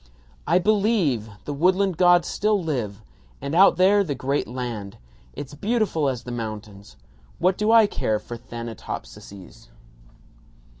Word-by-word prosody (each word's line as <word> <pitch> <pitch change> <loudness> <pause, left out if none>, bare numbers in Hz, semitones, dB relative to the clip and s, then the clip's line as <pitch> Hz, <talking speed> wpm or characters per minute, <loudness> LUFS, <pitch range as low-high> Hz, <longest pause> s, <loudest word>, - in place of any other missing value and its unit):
"I 175 - +4
believe! 190 - +1 0.2
The 145 - -4
woodland 185 +5 +2
gods 175 0 +4
still 210 0 +1
live! 120 - -3 0.4
And 140 +2 -5
out 180 0 +6
there, 200 +2 +5
the 150 -7 -3
great 135 +3 -1
land. 120 -6 -6 0.4
It's 140 - -8
beautiful 195 - 0
as 125 -3 -4
the 120 - -7
mountains. 105 -3 -7 0.4
What 185 +1 +2
do 210 +3 +1
I 225 -1 +7
care 110 - -1
for 120 - -8
Thanatopsises?" 110 - -9
145 Hz, 135 wpm, -23 LUFS, 115-190 Hz, 0.4 s, I